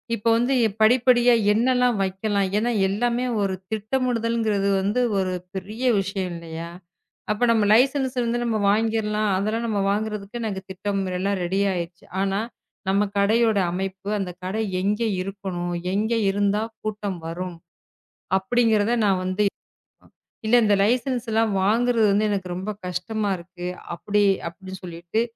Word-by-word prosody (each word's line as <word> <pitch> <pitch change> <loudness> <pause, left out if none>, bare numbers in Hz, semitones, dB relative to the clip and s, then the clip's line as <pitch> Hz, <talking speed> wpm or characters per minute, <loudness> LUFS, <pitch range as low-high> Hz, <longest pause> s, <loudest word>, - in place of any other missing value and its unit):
இப்ப 220 +1 -5
வந்து 245 +3 +1 0.3
படிப்படியா 245 +1 +5 0.2
என்னல்லாம் 250 +1 +2
வைக்கலாம். 195 +1 0
ஏன்னா 235 +3 +1 0.2
எல்லாமே 240 +5 0 0.2
ஒரு 195 -1 0 0.2
திட்டமிடுதல்ங்கறது 225 -2 0
வந்து 205 +6 +1 0.2
ஒரு 185 -1 0 0.2
பெரிய 210 +6 -6 0.2
விஷயம் 190 -1 -2
இல்லையா, 165 0 -7 0.6
அப்போ 210 +3 -1
நம்ம 220 -2 +3
லைசன்ஸ் 260 +2 +3
இருந்து 240 0 0
நாம 225 -2 0
வாங்கிக்கலாம். 215 0 +1
அதெல்லாம் 215 +4 -1
நாம 210 -3 0
வாங்குறதுக்கு 210 +1 -3
எனக்குத் 195 -4 -4
திட்டம் 195 +1 -2 0.2
எல்லாம் 200 +1 0
ரெடி 185 +3 0
ஆயிடுச்சு. 170 -1 -5 0.2
ஆனா 195 0 0 0.5
நம்ம 200 +2 +3
கடை 200 +3 +3
யோட 220 -3 +3
அமைப்பு 190 +2 -4
அந்தக் 180 -3 -5
கடை 195 +4 -2 0.2
எங்கே 210 +4 0
இருக்கணும், 185 -2 -4 0.2
எங்கே 220 +3 +1
இருந்தா 205 +1 +1 0.2
கூட்டம் 210 -3 -3
வரும் 175 +1 -5 0.8
அப்படிங்கறத 225 0 +2
நான் 190 -2 +2
வந்து 185 +3 0 1.0
இல்ல. 220 - +3
இந்த 205 -1 +4
லைசன்ஸ் 245 +2 0
எல்லாம் 220 -1 +2
வாங்குறது 215 -1 +3
எனக்கு 195 -3 -2
ரொம்ப 190 +4 -4 0.2
கஷ்டமா 200 +4 -2
இருக்கு. 175 +1 -9 0.3
அப்படி 205 +4 0 0.3
அப்படின்னு 190 +2 -10
சொல்லிட்டு 175 +4 -3
205 Hz, 135 wpm, -24 LUFS, 190-225 Hz, 1.0 s, படிப்படியா